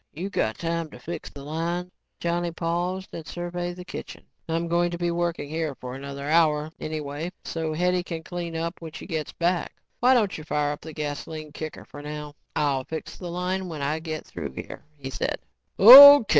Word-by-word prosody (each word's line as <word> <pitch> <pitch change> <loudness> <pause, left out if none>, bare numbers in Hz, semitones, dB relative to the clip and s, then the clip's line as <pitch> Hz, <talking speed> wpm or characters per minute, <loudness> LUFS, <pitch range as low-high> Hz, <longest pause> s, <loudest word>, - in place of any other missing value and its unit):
You 185 +6 -5
got 110 - 0
time 165 -1 -2
to - - -11
fix 170 -1 -6
the 140 - -11
line?" 170 +4 -3 0.3
Johnny 175 0 0
paused 175 +3 -2
and 160 - -7
surveyed 175 0 -4
the 180 0 -9
kitchen. - - -8 0.3
"I'm 165 +1 0
going 175 +1 +2
to 170 - -4
be 175 0 0
working 170 -3 -1
here 155 -1 -2
for 125 0 -7
another 140 +1 -6
hour 155 -1 +3
anyway 155 +2 -4
so 160 -1 -3
Hetty 180 +3 +1
can 165 -2 -6
clean 170 -1 -5
up 170 +2 -3
when 160 -2 -8
she - - -8
gets 160 -5 -3
back. 175 +1 -1 0.2
Why 255 +2 +5
don't 215 -6 +2
you - - -8
fire 150 -1 0
up 145 - -6
the 160 - -8
gasoline 150 0 -5
kicker 155 +1 -7
for 145 - -10
now 150 0 -6 0.2
and - - +2
I'll 135 -2 +1
fix 160 +4 -6
the 180 - -6
line 180 +1 -2
when 155 -4 -5
I 150 +3 0
get 155 -1 -5
through 70 -2 -6
here," - - -8
he 135 -1 -6
said. - - -2 0.4
"O. 280 +4 +12
165 Hz, 200 wpm, -26 LUFS, 150-175 Hz, 0.4 s, O